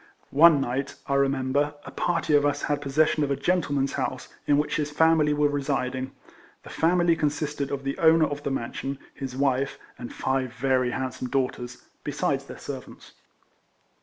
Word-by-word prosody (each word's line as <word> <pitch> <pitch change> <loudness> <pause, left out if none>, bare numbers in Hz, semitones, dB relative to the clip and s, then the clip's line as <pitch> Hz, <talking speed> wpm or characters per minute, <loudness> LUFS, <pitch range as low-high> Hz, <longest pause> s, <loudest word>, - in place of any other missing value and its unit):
One 155 +1 +7
night, 135 +1 -2
I 140 - -2
remember, 140 +1 +1
a - - -8
party 165 -3 0
of 145 -1 +5
us 145 0 0
had 145 -1 0
possession 150 +2 +2
of 140 - -1
a 140 - +1
gentleman's 145 -5 0
house, - - -3 0.2
in 145 - +4
which 150 - 0
his 150 -1 -1
family 160 0 +3
were 150 0 +3
residing. 135 -2 -2 0.5
The - - -11
family 175 0 +3
con 150 -2 +1
sisted 145 -1 -3
of 135 -1 -4
the 135 0 -2
owner 160 0 +5
of 145 -1 -4
the 140 - -2
mansion, 135 +1 -3 0.2
his 130 -2 -6
wife, 135 0 +1 0.2
and 120 - -7
five 130 -2 -1
very 130 +1 +1
handsome 130 0 -4
daughters, 125 -2 -2 0.2
besides - - -1
their - - -9
servants. - - -9
140 Hz, 170 wpm, -26 LUFS, 135-150 Hz, 0.5 s, One